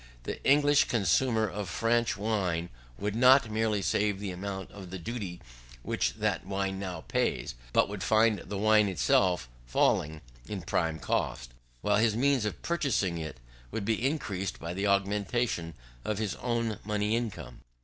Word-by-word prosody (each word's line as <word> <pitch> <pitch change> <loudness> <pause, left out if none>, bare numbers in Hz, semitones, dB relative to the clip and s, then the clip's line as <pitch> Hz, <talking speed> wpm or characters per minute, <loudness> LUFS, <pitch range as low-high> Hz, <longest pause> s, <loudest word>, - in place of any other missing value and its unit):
The - - -5
English 145 +1 +5
consumer 110 +2 +2
of 100 0 -5
French 115 +6 +1
wine 95 -5 -1 0.3
would 105 - -2
not 125 -1 +6
merely 110 -2 0
save 105 0 +1
the 100 -2 -4
amount 95 +1 -5
of 95 -3 -10
the 95 - -5
duty 95 -2 -5 0.4
which - - -1
that - - -1
wine 95 0 -2
now 90 -4 -5
pays, - - -1 0.2
but - - +4
would 100 -1 -6
find 110 0 +3
the 100 - -6
wine 105 +1 +4
itself 90 -1 +2 0.2
falling 75 +5 +1 0.3
in 100 -4 -5
prime 80 -1 0
cost, - - -2 0.3
while 105 0 +2
his 110 0 +3
means 135 -2 +2
of 105 - -4
purchasing 130 - 0
it 80 -5 -6 0.3
would 100 - -4
be 115 +1 0
increased 100 - -2
by 85 +1 -5
the 100 +3 -1
augmentation 100 -2 0 0.3
of 105 - -2
his 105 -2 -1
own 115 -3 -1
money 105 +1 0
income. 105 - -5
105 Hz, 160 wpm, -29 LUFS, 90-115 Hz, 0.4 s, not